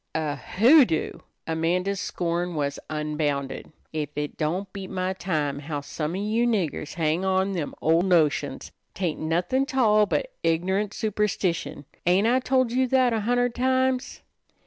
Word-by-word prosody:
"A 155 -2 -1
hoodoo!" 215 - +4 0.3
Amanda's 180 +4 0
scorn 175 0 -2
was 145 -1 -2
unbounded. 150 -3 -2 0.2
"Ef 150 -2 -2
it 150 0 -3
don't 180 +5 -2
beat 195 -2 -6
my 185 0 -2
time 150 -7 -2
how 145 0 -4
some 150 +3 -4
of 195 - -2
you 225 +3 +1
niggers 180 -10 -1
hang 165 +2 0
on 190 0 +1
to 180 - -2
them 150 - -4
ol' 165 +2 +4
notions. 170 -5 +1 0.2
'Tain't 175 -5 -2
nothin' 180 +12 0
't 275 -2 -5
all 215 -4 +4
but - - -1
ignorant 190 +5 0
superstition. 205 -8 -1 0.2
Ain't 185 +4 +4
I 245 +3 +4
tol' 255 -2 +1
you 255 +1 +2
that 255 -1 +3
a 225 - +1
hunderd 245 +2 +1
times?" 260 0 0
185 Hz, 155 wpm, -25 LUFS, 155-220 Hz, 0.3 s, hoodoo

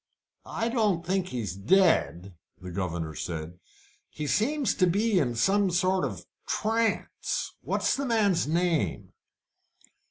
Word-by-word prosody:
"I 230 +1 -2
don't 210 -8 +1
think 185 0 0
he's 115 - -4
dead," 100 - +2 0.3
the 90 -2 -8
governor 85 -3 -3
said. 80 +2 -6 0.5
"He 150 - -6
seems 270 - +1
to 185 - +2
be 205 +2 +2
in 120 -6 0
some 195 - +2
sort 185 +1 +1
of - - -6 0.2
trance. 225 +1 -1
What's - - 0
the 275 0 -2
man's 205 - +2
name?" 170 0 0
180 Hz, 125 wpm, -27 LUFS, -, 0.5 s, dead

